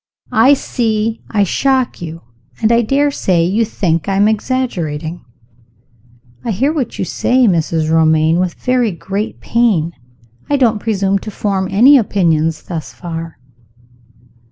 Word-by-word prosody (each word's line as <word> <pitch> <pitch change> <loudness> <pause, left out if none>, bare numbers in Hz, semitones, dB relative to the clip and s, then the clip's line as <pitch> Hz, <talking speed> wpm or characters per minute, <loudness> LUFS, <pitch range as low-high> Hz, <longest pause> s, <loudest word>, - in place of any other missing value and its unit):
I 250 +6 +5
see 225 -3 -2
I 205 -2 +2
shock 260 +5 0
you 165 -1 -7 0.4
and 220 - +2
I 235 0 +4
daresay 255 -8 +1
you 205 +6 +1
think 180 -6 -1
I 195 - 0
am 200 +2 +4
exaggerating?" 175 - -2 1.2
"I - - -4
hear 260 +9 0
what 275 -7 -3
you - - -2
say, 255 +7 +1
Mrs. 160 -3 0
Romayne, 160 +1 +3
with 180 -1 -1
very 250 -2 0
great 195 +4 -5
pain 200 -9 +1 0.6
I 290 - +2
don't 230 -5 +2
presume 200 -3 0
to 215 - -8
form 195 -2 -2
any 255 +9 +6
opinion 170 -8 +1 0.2
thus 165 -3 -5
far." 165 -2 -7
200 Hz, 135 wpm, -16 LUFS, 170-235 Hz, 1.2 s, any